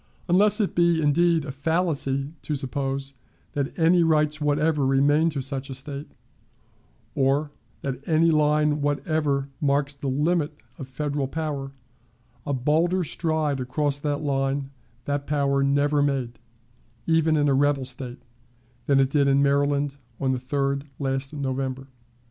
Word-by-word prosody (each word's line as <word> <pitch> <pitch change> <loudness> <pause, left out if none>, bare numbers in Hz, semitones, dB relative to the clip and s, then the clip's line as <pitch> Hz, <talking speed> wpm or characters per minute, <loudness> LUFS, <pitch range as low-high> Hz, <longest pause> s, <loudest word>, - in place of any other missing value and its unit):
Unless 205 +4 +4
it 205 - 0
be, 170 -1 +3
indeed, 160 +1 +2
a 140 - -4
fallacy 145 -2 -1
to 150 - -3
suppose 135 0 -3 0.4
that 140 -1 -3
any 170 +2 +4
rights 155 -2 +2
whatever 150 0 +1
remain 145 +4 +3
to 140 -4 -3
such 135 0 -2
a 135 - -5
State, 140 +2 -6 1.0
or 140 +2 +1 0.3
that 135 0 -5
any 165 +1 +4
line 150 -1 +2
whatever 145 -1 0
marks 145 0 +1
the 140 0 -6
limit 150 +4 0 0.2
of 135 - -6
Federal 145 +1 -2
power, 140 -2 -4 0.7
a 145 - 0
bolder 165 +8 +1
stride 155 -3 -1
across 140 +3 -1
that 145 0 -2
line 135 -1 -1 0.3
that 145 0 -2
power 140 -2 +1
never 145 +1 +2
made, 135 -4 -1 0.7
even 160 -1 +3
in 145 -1 +2
a 140 - +3
rebel 140 0 +2
State, 125 -1 -8 0.6
than 140 -1 +4
it 135 0 +2
did 140 -1 +3
in 140 0 +4
Maryland 140 0 +1 0.2
on 135 -1 +1
the 130 - -1
3d 140 +2 -1
of 145 - -19
last 135 -1 -2
November. 135 -2 -3
145 Hz, 145 wpm, -25 LUFS, 135-150 Hz, 1.0 s, Unless